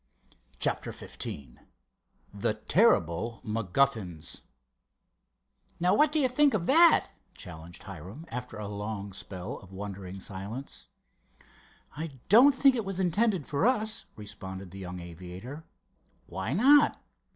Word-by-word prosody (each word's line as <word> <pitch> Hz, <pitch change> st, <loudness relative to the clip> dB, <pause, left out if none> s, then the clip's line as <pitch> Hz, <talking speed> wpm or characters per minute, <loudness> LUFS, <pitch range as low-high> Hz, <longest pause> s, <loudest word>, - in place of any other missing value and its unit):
CHAPTER -, -, +1 dB
XV 70 Hz, -1 st, -6 dB, 0.7 s
"THE 105 Hz, +1 st, -1 dB
TERRIBLE 110 Hz, -, +2 dB
MACGUFFINS" 110 Hz, -, -1 dB, 1.4 s
"Now 180 Hz, +1 st, +3 dB
what 300 Hz, 0 st, +4 dB
do 315 Hz, -, 0 dB
you 270 Hz, -, +4 dB
think 275 Hz, +1 st, +3 dB
of 175 Hz, -5 st, -1 dB
that?" 330 Hz, -, +6 dB, 0.3 s
challenged 85 Hz, -2 st, -10 dB
Hiram, 100 Hz, -, -9 dB
after 125 Hz, -1 st, -6 dB
a 105 Hz, -1 st, -5 dB
long 100 Hz, -1 st, -5 dB
spell 95 Hz, +4 st, -6 dB
of 95 Hz, -, -16 dB
wondering 95 Hz, -1 st, -7 dB
silence. 100 Hz, +8 st, -7 dB, 1.1 s
"I 150 Hz, -3 st, -6 dB
don't 255 Hz, +8 st, +7 dB
think 270 Hz, -1 st, +5 dB
it 230 Hz, -, -1 dB
was 195 Hz, -1 st, -3 dB
intended 190 Hz, -, +1 dB
for 150 Hz, +10 st, +1 dB
us," 220 Hz, -3 st, 0 dB
responded 95 Hz, -3 st, -8 dB
the 95 Hz, -, -9 dB
young 90 Hz, -1 st, -6 dB
aviator. 90 Hz, -, -9 dB, 0.6 s
"Why 95 Hz, +7 st, -4 dB
not?" 285 Hz, -, +5 dB
110 Hz, 120 wpm, -29 LUFS, -, 1.4 s, don't